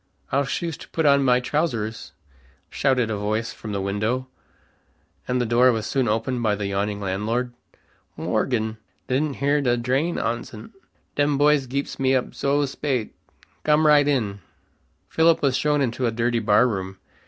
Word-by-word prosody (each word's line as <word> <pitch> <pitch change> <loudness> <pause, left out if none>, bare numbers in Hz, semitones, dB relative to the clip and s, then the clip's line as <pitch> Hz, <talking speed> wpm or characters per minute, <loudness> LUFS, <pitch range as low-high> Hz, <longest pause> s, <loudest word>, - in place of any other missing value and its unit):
I'll 140 +1 +2
shoost 165 +4 -4
put 160 - -1
on 140 -1 +5
my 125 -1 +4
trowsers," 120 -6 -2 0.6
shouted 125 -5 +1
a 105 - -1
voice 110 +3 -2
from 110 - -8
the 100 -1 -2
window, 105 +6 -1 1.0
and 125 0 0
the 120 - +1
door 120 +2 +4
was 110 -2 -2
soon 135 -3 0
opened 115 +3 -1
by 110 -3 +1
the 100 0 -4
yawning 100 +1 -2
landlord. 110 +6 -2 0.6
"Morgen! 110 -4 -1 0.3
Didn't 140 +2 0
hear 145 +2 +1
d' 120 -3 +1
drain 135 +8 0
oncet. 115 -1 -4 0.4
Dem 145 0 +1
boys 145 -2 +3
geeps 140 +3 -4
me 135 0 +3
up 130 - -1
zo 140 +1 +1
spate. 135 -4 -3 0.5
Gom 150 +1 +3
right 145 -1 +5
in." 110 -8 0 0.7
Philip 165 -1 +3
was 135 -3 +2
shown 150 +1 +1
into 125 -1 0
a - - 0
dirty 120 +1 0
bar 105 +2 +4
room. 95 -4 -4
125 Hz, 160 wpm, -23 LUFS, 110-140 Hz, 1.0 s, on